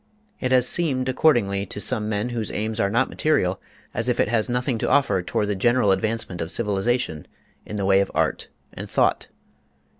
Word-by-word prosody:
It 130 Hz, -, -2 dB
has 125 Hz, -1 st, +4 dB
seemed 135 Hz, -7 st, +1 dB
accordingly, 115 Hz, -8 st, +2 dB
to -, -, -5 dB
some 110 Hz, -1 st, -1 dB
men 110 Hz, +3 st, -1 dB
whose 115 Hz, -3 st, -3 dB
aims 110 Hz, +1 st, -3 dB
are 100 Hz, -, +2 dB
not 120 Hz, +6 st, +2 dB
material, 95 Hz, -12 st, 0 dB, 0.3 s
as -, -, -1 dB
if -, -, 0 dB
it -, -, +2 dB
has 115 Hz, 0 st, +1 dB
nothing 125 Hz, -1 st, -1 dB
to -, -, -1 dB
offer 120 Hz, -10 st, +3 dB
toward 105 Hz, +4 st, -1 dB
the 105 Hz, -, 0 dB
general 120 Hz, +1 st, +3 dB
advancement 110 Hz, -2 st, -2 dB
of 80 Hz, -, -3 dB
civilization 105 Hz, -, -1 dB, 0.4 s
in 105 Hz, -, -6 dB
the 100 Hz, -2 st, -2 dB
way 95 Hz, 0 st, +4 dB
of 100 Hz, -, 0 dB
art -, -, 0 dB, 0.3 s
and -, -, -7 dB
thought. -, -, +1 dB
110 Hz, 190 wpm, -23 LUFS, 100-125 Hz, 0.4 s, has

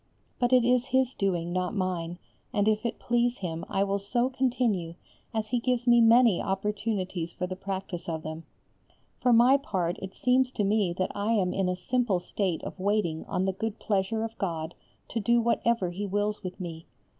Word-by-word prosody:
But 245 Hz, 0 st, +2 dB
it 250 Hz, -2 st, +5 dB
is 250 Hz, +1 st, +3 dB
His 260 Hz, 0 st, +2 dB
doing, 175 Hz, -3 st, -1 dB
not 185 Hz, +2 st, -1 dB
mine, 175 Hz, -3 st, -2 dB, 0.3 s
and 205 Hz, 0 st, +1 dB
if 215 Hz, +2 st, +2 dB
it -, -, -5 dB
please 240 Hz, 0 st, +1 dB
Him 165 Hz, -3 st, -4 dB
I 195 Hz, -, +1 dB
will 200 Hz, 0 st, 0 dB
so 240 Hz, +6 st, 0 dB
continue 235 Hz, -10 st, 0 dB, 0.4 s
as 220 Hz, -2 st, -2 dB
He 245 Hz, -, +1 dB
gives 245 Hz, 0 st, 0 dB
me 240 Hz, -1 st, +6 dB
many 230 Hz, -3 st, +6 dB
opportunities 195 Hz, -3 st, -2 dB
for 180 Hz, -, -3 dB
the 185 Hz, 0 st, -5 dB
practice 190 Hz, -2 st, -5 dB
of 160 Hz, -1 st, -3 dB
them. 155 Hz, +1 st, -6 dB, 0.8 s
For 250 Hz, -, +3 dB
my 240 Hz, +4 st, +6 dB
part 185 Hz, -10 st, -2 dB
it 190 Hz, 0 st, -7 dB
seems 255 Hz, 0 st, +2 dB
to 210 Hz, -, 0 dB
me 200 Hz, -2 st, +2 dB
that 185 Hz, -, 0 dB
I 205 Hz, +3 st, 0 dB
am 185 Hz, -5 st, +1 dB
in 195 Hz, -1 st, 0 dB
a 180 Hz, -, 0 dB
simple 225 Hz, +2 st, 0 dB
state 180 Hz, -1 st, -2 dB
of -, -, -7 dB
waiting 190 Hz, -5 st, 0 dB
on 185 Hz, -, -1 dB
the 190 Hz, -, 0 dB
good 220 Hz, +3 st, -3 dB
pleasure 210 Hz, +2 st, 0 dB
of 225 Hz, 0 st, -5 dB
God 165 Hz, -3 st, -2 dB, 0.4 s
to 230 Hz, -, -2 dB
do 235 Hz, +3 st, +3 dB
whatever 235 Hz, -4 st, +1 dB
He 200 Hz, +3 st, -4 dB
wills 205 Hz, +2 st, -1 dB
with 185 Hz, -1 st, -7 dB
me. 165 Hz, -3 st, -7 dB
200 Hz, 195 wpm, -28 LUFS, 180-235 Hz, 0.8 s, me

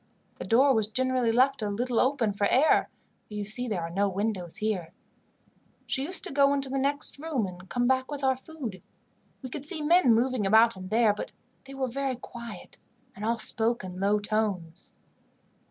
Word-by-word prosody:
The -, -, -5 dB
door 265 Hz, +4 st, +5 dB
was 220 Hz, -3 st, +1 dB
generally 255 Hz, +1 st, +1 dB
left 260 Hz, +2 st, +2 dB
a 210 Hz, -, -1 dB
little 235 Hz, +3 st, -1 dB
open 255 Hz, -6 st, +1 dB
for 200 Hz, 0 st, +1 dB
air, 275 Hz, +9 st, +3 dB, 0.4 s
for 210 Hz, -, -10 dB
you 205 Hz, -1 st, -3 dB
see 245 Hz, +4 st, +1 dB
there 195 Hz, -7 st, -2 dB
are 165 Hz, -, -5 dB
no 200 Hz, +3 st, +1 dB
windows 195 Hz, -3 st, -2 dB
here. 210 Hz, -7 st, -2 dB, 0.9 s
She 265 Hz, -, -1 dB
used 365 Hz, +6 st, -1 dB
to -, -, -4 dB
go 280 Hz, 0 st, +4 dB
into 275 Hz, -1 st, -3 dB
the 270 Hz, +1 st, -1 dB
next 280 Hz, +1 st, -1 dB
room 295 Hz, -8 st, -1 dB
and 180 Hz, 0 st, -10 dB
come 245 Hz, 0 st, 0 dB
back 260 Hz, +1 st, +1 dB
with 290 Hz, -2 st, -5 dB
our 265 Hz, -1 st, +3 dB
food. 260 Hz, -, -8 dB, 0.6 s
We 255 Hz, -, -7 dB
could 290 Hz, -1 st, -6 dB
see 310 Hz, 0 st, -2 dB
men 300 Hz, -7 st, +5 dB
moving 240 Hz, -3 st, +1 dB
about 225 Hz, +2 st, +5 dB
in 185 Hz, 0 st, -8 dB
there, 220 Hz, +1 st, +3 dB
but 210 Hz, -, -7 dB, 0.3 s
they 275 Hz, 0 st, -10 dB
were 265 Hz, -1 st, -1 dB
very 270 Hz, +1 st, -2 dB
quiet, 235 Hz, -5 st, -10 dB, 0.4 s
and 210 Hz, -, -9 dB
all 230 Hz, +2 st, 0 dB
spoke 225 Hz, +1 st, +1 dB
in 185 Hz, 0 st, -7 dB
low 200 Hz, +2 st, +2 dB
tones. 205 Hz, -5 st, -3 dB
235 Hz, 195 wpm, -27 LUFS, 205-265 Hz, 0.9 s, door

